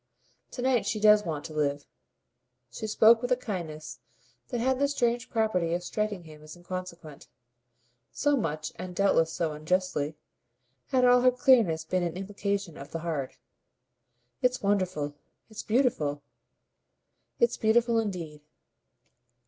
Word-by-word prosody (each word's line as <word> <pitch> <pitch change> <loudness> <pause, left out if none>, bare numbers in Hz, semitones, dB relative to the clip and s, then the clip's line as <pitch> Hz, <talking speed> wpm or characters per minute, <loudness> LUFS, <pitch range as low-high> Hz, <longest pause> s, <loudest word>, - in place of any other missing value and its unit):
"To 245 - -4
night 250 -5 +2
she 215 +1 -1
does 210 0 +6
want 155 -3 -4
to 155 - -8
live." 145 -1 -1 0.9
She 220 - -5
spoke 225 +2 +5
with 245 - -3
a - - +6
kindness 160 -9 -6 0.5
that 245 - -3
had 260 +2 +1
the 280 - +3
strange 240 -3 0
property 185 -7 0
of 175 - -4
striking 210 -1 -3
him 155 -2 -13
as 155 +2 -11
inconsequent 175 -4 -8 0.8
so 290 0 +1
much, 155 - -2
and 180 -1 -7
doubtless 170 -4 +3
so 165 -1 -1
unjustly, 155 -1 -1 0.7
had 255 -2 +2
all 245 0 +6
her 255 - +6
clearness 235 -11 +3
been 185 +3 0
an 175 0 -2
implication 200 -2 -3
of 140 - -9
the 165 - -4
hard. 145 -6 -3 1.1
"It's 250 -2 +1
wonderful. 185 -7 0 0.4
It's 215 - -6
beautiful." 185 - 0 1.2
"It's 475 - +2
beautiful 230 +1 +3
indeed." 170 -8 -4
185 Hz, 140 wpm, -28 LUFS, 160-230 Hz, 1.2 s, does